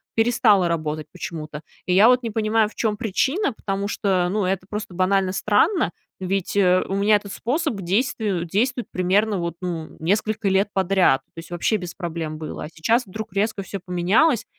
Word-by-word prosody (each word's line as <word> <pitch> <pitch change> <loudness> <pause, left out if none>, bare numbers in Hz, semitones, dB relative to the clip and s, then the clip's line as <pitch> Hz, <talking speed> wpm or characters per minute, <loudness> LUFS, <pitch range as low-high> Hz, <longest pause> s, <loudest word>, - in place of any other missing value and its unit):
перестало 225 -5 +4
работать 155 -2 -2
почему-то. 155 -4 -7 0.3
И 180 - +2
я 205 +5 +7
вот 250 0 +4
не 230 - -2
понимаю, 215 0 +1
в - - -20
чём 215 -2 -1
причина, 260 - 0
потому 200 -1 -3
что, 185 -4 0
ну, 205 -1 0
это 185 0 -2
просто 210 -3 -5
банально 185 +1 +2
странно. 215 - +2 0.3
Ведь, 190 +1 -2
э, 185 -2 +4
у 195 - -4
меня 205 +2 +4
этот 200 -1 -9
способ 300 +4 -1
к 195 - -6
действию 200 -2 0
действует 240 +7 0
примерно, 195 +2 +1
вот, 170 -1 -3
ну, 165 -3 -5
несколько 210 +4 0
лет 195 +2 +2
подряд. 190 -8 +3
То 165 - -9
есть 165 - -11
вообще 175 +5 +1
без 180 -2 -7
проблем 165 -4 -4
было, 155 -1 -6
а - - -8
сейчас 225 +9 0
вдруг 215 0 -7
резко 200 0 -1
всё 195 +1 -6
поменялось. 195 - +2
195 Hz, 185 wpm, -23 LUFS, 180-215 Hz, 0.3 s, я